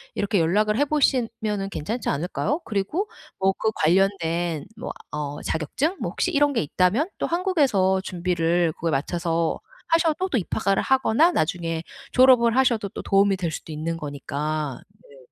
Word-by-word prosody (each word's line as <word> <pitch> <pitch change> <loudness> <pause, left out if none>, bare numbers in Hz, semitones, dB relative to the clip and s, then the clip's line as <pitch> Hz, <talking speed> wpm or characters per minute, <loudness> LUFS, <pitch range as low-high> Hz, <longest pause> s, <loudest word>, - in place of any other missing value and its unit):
이렇게 200 -1 +1
연락을 210 +6 +2
해 290 - +3
보시면은 230 -8 0
괜찮지 210 +7 -3
않을까요? 180 - -1
그리고 225 - -2 0.3
뭐 190 0 +2
그 220 - +1
관련된 170 -2 +1
뭐 225 - -5 0.2
어 145 -1 -4
자격증? 260 - -1
뭐 - - -2
혹시 360 - -1
이런 290 -2 +3
게 235 - +1
있다면 185 - +1
또 - - -1
한국에서 280 - +2
준비를 175 -2 0
그거에 165 +1 -2
맞춰서 165 +3 -1 0.3
하셔도 330 +3 +2
또 265 - +1
입학을 195 0 0
하거나 265 +5 +3
나중에 165 - -1 0.3
졸업을 250 -2 +5
하셔도 240 -6 +2
또 - - -7
도움이 195 0 +3
될 175 -3 -2
수도 160 - -7
있는 165 +2 -3
거니까 145 -1 -4 0.3
네. 140 - -16
195 Hz, 335 characters per minute, -24 LUFS, 165-255 Hz, 0.3 s, 졸업을